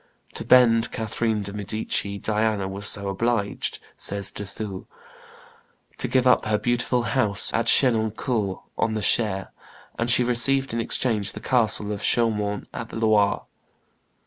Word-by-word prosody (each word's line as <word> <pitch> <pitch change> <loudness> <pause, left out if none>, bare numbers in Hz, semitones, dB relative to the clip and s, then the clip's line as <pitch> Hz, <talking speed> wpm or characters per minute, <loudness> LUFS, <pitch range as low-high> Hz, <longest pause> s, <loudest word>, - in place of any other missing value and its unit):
"To - - -5
bend 120 -2 +4
Catherine 110 -1 -2
de' 100 0 -5
Medici, 105 0 -3
Diana 105 -1 -1
was 100 +2 -6
also 100 0 -6
obliged," 100 +1 -2 0.2
says 100 -1 -1
De 105 - -7
Thou, 100 -1 -7 1.1
"to - - +2
give 130 -1 +1
up 125 - +4
her 105 0 +1
beautiful 120 +1 0
house 110 -7 +2
at 115 0 0
Chenonceaux 110 -4 +2 0.2
on 110 -1 0
the 110 - -3
Cher, 100 -4 +1 0.5
and 115 +1 0
she 125 +1 +5
received 135 +2 +2
in 115 - -1
exchange 110 -3 0
the - - -8
castle 110 -4 +1
of 105 -1 -5
Chaumont 105 -3 0
on 115 - -6
the - - -11
Loire." 110 -2 +2
110 Hz, 145 wpm, -23 LUFS, 100-120 Hz, 1.1 s, she